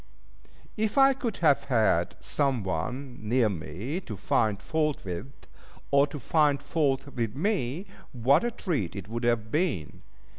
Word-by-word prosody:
If 220 +4 -1
I 270 0 +7
could 245 -4 -3
but - - -12
have 150 -4 +4
had 110 -9 +2
some 135 -6 0
one 120 - -3
near 115 +1 +2
me 95 - -4
to 110 - -7
find 105 +1 +1
fault 150 +1 -1
with, 95 +8 -5 0.6
or 140 +1 +5
to 150 - -7
find 145 +1 +2
fault 145 -3 0
with 115 -5 -3
me, 170 - -1 0.3
what 130 - +3
a 240 - +1
treat 160 - -2
it 100 -1 -6
would 120 +2 -3
have 115 -2 +1
been! 150 - -1
130 Hz, 155 wpm, -28 LUFS, 110-155 Hz, 0.6 s, I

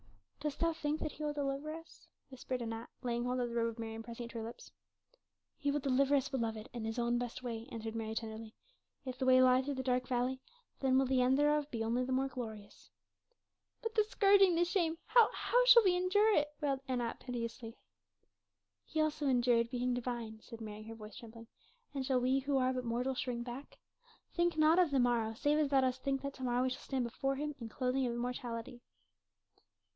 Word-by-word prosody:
"Dost 295 -1 -3 0.2
think 295 +1 0
that 305 - -3
He 305 - -8
will 295 -1 -1
deliver 285 +1 -2
us?" 325 +1 -11 0.2
whispered 255 -1 -4
Anat, 225 0 -5
laying 240 -1 -1
hold 250 +1 -1
of 245 -1 -1
the 235 - -6
robe 230 -1 +2
of 230 - -9
Mary 225 -1 -5
and 225 0 -7
pressing 235 +1 -7
it 235 - -10
to 230 - -5
her - - -4
lips. 230 +2 -9 0.9
"He 285 - 0
will 290 +1 +1
deliver 275 +1 +2
us, 275 -1 +1
beloved, 225 -5 -3
in 235 -2 -5
his 225 +2 -3
own 240 0 +1
best 245 +1 -5
way," 230 -1 -5
answered 225 -1 -5
Mary 220 -1 -3
tenderly. 220 0 -6 0.5
"If 255 -1 -6
the 260 - 0
way 255 0 +7
lie 255 0 +5
through 280 +1 -3
the 260 - -3
dark 250 -1 0
valley, 255 +1 -1 0.4
then 260 -1 +3
will 270 - +4
the 260 0 +2
end 255 +2 +4
thereof 295 0 +2
be 230 -5 -3
only 235 +3 0
the 255 - -3
more 265 +1 +1
glorious." 220 -5 -8 0.9
"But 455 -1 -3
the 430 - +4
scourging 395 -3 +5
the 345 +1 +3
shame, 340 -3 0
how 455 0 +6
how - - +2
shall - - +9
we 370 -3 +4
endure 410 +4 +3
it?" 295 0 +2
wailed 280 -3 0
Anat 245 -3 -2
piteously. 230 -1 -5 1.1
"He 315 - -4
also 310 -1 +1
endured 240 -2 +3
being 250 0 -1
divine," 235 -3 -4
said 230 0 -11
Mary, 210 -1 -7
her 225 +1 -9
voice 215 -1 -10
trembling; 230 0 -11 0.5
"and 275 -2 -2
shall 260 -1 +2
we 260 +2 +2
who 275 +1 0
are 260 0 +2
but 255 0 -3
mortal 245 +3 -1
shrink 245 -2 -3
back? 255 +3 -8 0.6
Think 345 -2 +1
not 315 +3 +5
of 355 -3 +4
the 275 -2 +2
morrow, 235 -3 +1
save 295 +6 +2
as 300 -2 +2
thou 275 -1 +4
dost 260 0 0
think 275 -1 -1
that 280 0 -3
to 260 - -9
morrow 245 0 +1
we 260 - 0
shall - - -5
stand 265 -2 -2
before 270 +3 -2
Him 295 +2 -3
in 230 -2 -6
clothing 255 +2 0
of 235 - -2
immortality." 240 0 -4
255 Hz, 215 wpm, -34 LUFS, 235-285 Hz, 1.1 s, shall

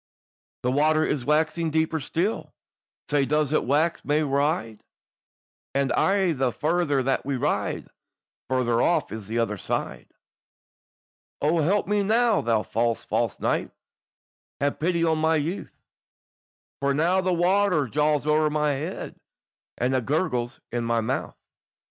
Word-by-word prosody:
"The 125 - +1
water 155 +3 +3
is 130 -5 -2
waxing 160 +2 +1
deeper 160 +1 0
still, 175 +9 -2 0.6
Sae 145 -1 +3
does 150 +1 +1
it - - +2
wax 155 +6 +1
mair 150 +1 +1
wide; 140 - 0 0.9
And 140 -1 +1
aye 195 -2 +2
the 130 -3 0
farther 155 -2 0
that 135 +1 0
we 140 0 -2
ride 125 - -1
on, - - -24 0.6
Farther 120 -2 +1
off 175 - +1
is 110 -3 -7
the 115 +2 -3
other 105 -4 -1
side. - - -3 1.3
"O 160 +3 +2
help 195 +7 +2
me 205 0 +2
now, 225 +2 +3
thou 115 -2 +1
false, 115 0 -1
false - - -1
knight, - - 0 0.9
Have 140 0 -1
pity 170 +1 +1
on 160 -1 +2
my 160 +1 +2
youth, 160 +5 -3 1.0
For 140 0 +1
now 175 +5 +2
the 185 0 0
water 180 -3 +2
jawes 150 +3 +1
owre 155 0 +3
my 150 0 +1
head, 150 +6 -5 0.6
And 125 +2 0
it 130 -3 0
gurgles 130 -5 -1
in 120 0 -2
my 115 0 +1
mouth." 110 - -3
150 Hz, 145 wpm, -25 LUFS, 130-165 Hz, 1.3 s, water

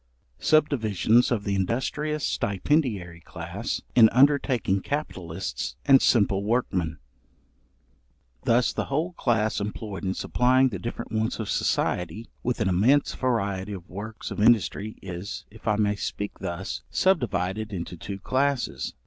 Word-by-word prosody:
Subdivisions 120 - +3
of 110 -4 0
the 100 - -1
industrious 135 +9 -1
stipendiary 100 - 0
class, 95 +5 -5
in 115 -2 +7
undertaking 125 -7 +3
capitalists 85 - -4
and 135 -1 +7
simple 100 -4 +3
workmen. 95 -8 0 1.5
Thus 120 +1 +3
the - - -2
whole 160 +6 -1
class 110 -8 +1
employed 105 -1 -5
in 95 -1 -1
supplying 130 +1 +3
the 100 -6 -5
different 115 +4 -6
wants 110 0 -1
of 110 - -3
society, 90 +6 -1
with 125 0 -1
an 110 - +2
immense 110 +11 +3
variety 100 -6 -1
of 90 -2 -8
works 105 +3 -7
of - - -3
industry, 110 -1 +2
is, 90 +2 -6
if 110 +1 -13
I 105 - +3
may 105 -1 +1
speak 105 0 -4
thus, 85 +3 -4
subdivided 110 - 0
into 90 -2 -5
two 95 +4 -6
classes. 130 +5 -1
110 Hz, 130 wpm, -26 LUFS, 95-125 Hz, 1.5 s, in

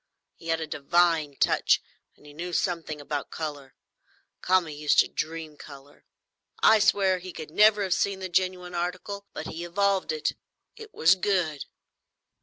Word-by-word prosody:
He 165 - -14
had 165 0 +1
a 160 - -3
divine 155 0 +1
touch, - - +3 0.4
and - - -22
he 145 - -13
knew 175 +3 -6
something 165 -4 -2
about 145 0 -4
colour. 145 -4 -6 0.7
Kami 180 -4 +2
used 150 0 +1
to - - -2
dream 160 -1 -5
colour; 140 -1 -14 0.6
I 220 0 +7
swear 195 -3 +3
he 185 +1 -8
could 155 -3 -9
never 210 +2 +5
have 190 -2 +1
seen 200 -1 0
the 190 - -4
genuine 180 0 -1
article; 180 +3 -4
but - - -7
he 170 - -6
evolved 195 +1 0
it; 155 -1 -1
and - - -23 0.4
it 440 -1 -11
was 170 - +5
good." 180 -6 -1
175 Hz, 165 wpm, -26 LUFS, 155-185 Hz, 0.7 s, I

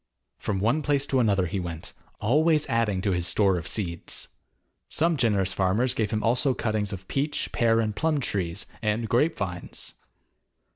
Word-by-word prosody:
From 105 - -2
one 115 +10 +2
place 140 -1 +1
to 135 -2 +1
another 100 -6 +2
he 95 +3 -2
went, 85 -3 -6 0.3
always 150 +6 +3
adding 110 -5 0
to 100 - +1
his 90 -1 0
store 95 -3 +3
of 85 - -8
seeds. 85 -6 -1 0.6
Some 165 +1 +2
generous 100 -8 +1
farmers 100 +7 +1
gave 110 -3 -1
him 110 0 -1
also 125 +3 +2
cuttings 110 -2 -1
of 95 -1 -7
peach, 145 +2 -1
pear, 115 -1 +3
and 110 -2 -1
plum 155 +5 +1
trees, 95 -6 -2 0.2
and 110 +1 0
grape 145 +9 +2
vines. 90 -3 -5
110 Hz, 165 wpm, -26 LUFS, 95-130 Hz, 0.6 s, always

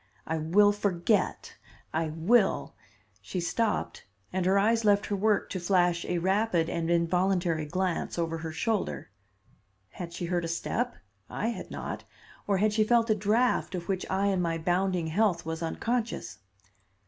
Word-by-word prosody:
"I 160 0 -2
will 200 +7 +4
forget 200 0 0 0.4
I 160 0 0
will 190 +8 +2 0.2
" - - -36
She 185 - -4
stopped 210 +5 -1 0.3
and 185 -1 0
her 195 +1 +4
eyes 225 +3 +3
left 205 -1 +3
her 205 - -1
work 210 +1 +1
to 185 - -2
flash 175 -1 +2
a 180 - -1
rapid 190 -1 +1
and 165 -1 -2
involuntary 170 -1 +1
glance 185 +2 -2
over 165 -1 -1
her 160 0 -5
shoulder. 185 - -2 0.8
Had 175 -2 -7
she 175 - -4
heard 175 0 -1
a - - -2
step? 240 +8 -2 0.3
I 225 - -2
had 235 - -6
not. - - -5 0.4
Or 200 -1 +2
had 210 +2 +2
she 215 0 +3
felt 230 0 +3
a - - +4
draft 215 +1 +1
of 170 -1 -5
which 190 -2 -2
I 190 +1 +1
in 190 -2 +1
my 165 -1 0
bounding 180 +1 0
health 175 +1 +1
was 160 0 -4
unconscious? 220 - -2
185 Hz, 165 wpm, -28 LUFS, 170-210 Hz, 0.8 s, will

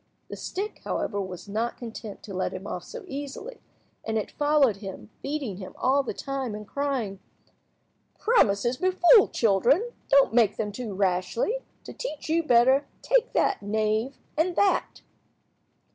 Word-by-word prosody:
The - - -5
stick, 405 +3 -5
however, 205 -2 -2
was 185 -2 -7
not 225 +4 -2
content 225 -3 -8
to 200 - -8
let 185 - -1
him 185 +1 -7
off - - -5
so - - -8
easily, 290 - -7 0.4
and 220 0 -1
it 215 - -3
followed 290 -7 +3
him, 190 - -9
beating 275 -9 -3
him 190 -1 -9
all 270 +2 +3
the 270 - -4
time, 270 -5 -4
and 210 -1 -8
crying— 260 -9 -2 1.0
"Promises 240 - +3
befool 370 - +6
children. 245 - +2 0.2
Don't 275 -4 +5
make 230 -4 +4
them 210 -2 -2
too 215 -2 -5
rashly. 195 - 0 0.2
To - - -9
teach 310 -11 -6
you 330 +1 +3
better, 265 0 +4 0.2
take - - +2
that, - - +2
knave, 215 +5 0 0.2
and 340 +3 +1
that." 395 - +1
245 Hz, 150 wpm, -26 LUFS, 205-300 Hz, 1.0 s, befool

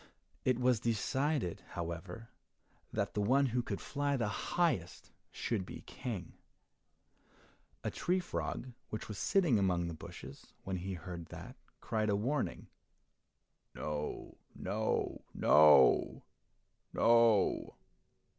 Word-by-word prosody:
It 130 -2 +3
was 125 -2 +3
decided, 120 - 0
however, 85 +6 -5 0.6
that - - -1
the 105 - 0
one 135 +7 +4
who 125 -1 0
could 105 -4 -4
fly 145 -1 -1
the 115 -4 0
highest 100 - -1 0.2
should 110 -5 -2
be - - -9
King. 100 -9 -6 1.5
A - - -1
tree 180 +1 0
frog 130 -7 -4 0.2
which 110 - -5
was 105 -3 -6
sitting 165 - +3
among 90 -3 +1
the 85 - -4
bushes, 80 - -11
when 95 -1 -3
he 95 +1 -4
heard 85 -1 -7
that, - - -9 0.3
cried 110 -1 0
a 100 - +3
warning, 130 +7 -1 1.1
"No, 75 0 -4 0.2
no, 110 +4 -1
no! 75 -1 +6 0.7
no!" 115 -3 +4
110 Hz, 115 wpm, -34 LUFS, 90-125 Hz, 1.5 s, no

